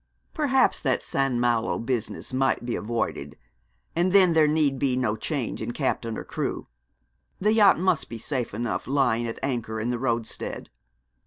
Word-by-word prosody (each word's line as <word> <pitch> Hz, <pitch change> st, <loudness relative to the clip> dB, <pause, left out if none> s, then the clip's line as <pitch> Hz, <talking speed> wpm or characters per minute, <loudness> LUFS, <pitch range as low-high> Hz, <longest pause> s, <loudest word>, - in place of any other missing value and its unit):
Perhaps 275 Hz, -4 st, +2 dB
that 130 Hz, -4 st, 0 dB
St. 135 Hz, -2 st, 0 dB
Malo 120 Hz, -2 st, +1 dB
business 120 Hz, +1 st, -3 dB
might 130 Hz, -2 st, +1 dB
be 120 Hz, -, -2 dB
avoided; 105 Hz, -10 st, -3 dB, 0.6 s
and 175 Hz, +2 st, +2 dB
then 185 Hz, -3 st, +6 dB
there 160 Hz, -2 st, +5 dB
need 150 Hz, -3 st, +1 dB
be 130 Hz, -3 st, +1 dB
no 110 Hz, -5 st, 0 dB
change 130 Hz, +1 st, -3 dB
in 115 Hz, +2 st, -3 dB
captain 115 Hz, -5 st, -2 dB
or -, -, -5 dB
crew. -, -, -3 dB, 0.7 s
The 210 Hz, +3 st, +3 dB
yacht 210 Hz, -3 st, +6 dB
must 175 Hz, -3 st, +1 dB
be 115 Hz, -, -6 dB
safe 125 Hz, +1 st, -3 dB
enough 120 Hz, 0 st, -3 dB
lying 125 Hz, -4 st, +1 dB
at 115 Hz, -, -5 dB
anchor 120 Hz, -5 st, -2 dB
in 115 Hz, +2 st, -2 dB
the 120 Hz, -1 st, -1 dB
roadstead. 115 Hz, -3 st, -3 dB
130 Hz, 165 wpm, -26 LUFS, 115-150 Hz, 0.7 s, then